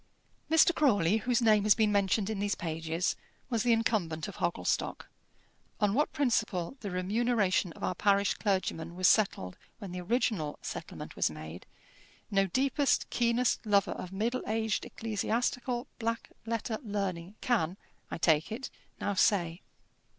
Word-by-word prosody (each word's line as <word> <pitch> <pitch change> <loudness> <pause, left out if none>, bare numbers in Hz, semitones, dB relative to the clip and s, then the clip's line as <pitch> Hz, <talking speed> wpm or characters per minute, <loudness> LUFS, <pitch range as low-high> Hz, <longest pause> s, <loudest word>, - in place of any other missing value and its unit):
Mr. 320 +2 +5
Crawley, 210 - +3
whose 245 +1 +1
name 215 -2 +5
has 210 0 +5
been 215 -2 +2
mentioned 200 0 +2
in 215 -2 -3
these 205 0 0
pages, 165 +1 -2 0.4
was 230 -2 +1
the 240 - +2
incumbent 205 -9 +1
of 200 - -9
Hogglestock. 175 0 -1 0.7
On 205 -2 +2
what 295 +6 +1
principle 220 -8 0
the 205 - -5
remuneration 195 0 +1
of - - -12
our - - 0
parish 200 +2 +2
clergymen 175 -5 -2
was 185 0 +3
settled 95 - +2 0.2
when 200 -4 -8
the 180 0 -5
original 185 - 0
settlement - - -7
was - - +2
made, 80 +2 -9 0.6
no 195 -1 +3
deepest, 270 - +1
keenest 240 +1 +1
lover 205 -3 +2
of 180 - -6
middle 230 +6 -1
aged 220 -1 0
ecclesiastical 240 +3 -2
black 230 0 -2 0.2
letter 225 -1 -2
learning 200 -4 -3
can, 195 -8 +1 0.3
I - - -4
take 160 +2 +2
it, 250 +5 -5 0.3
now 205 - -1
say. 180 -3 +2
205 Hz, 145 wpm, -30 LUFS, 180-230 Hz, 0.7 s, Mr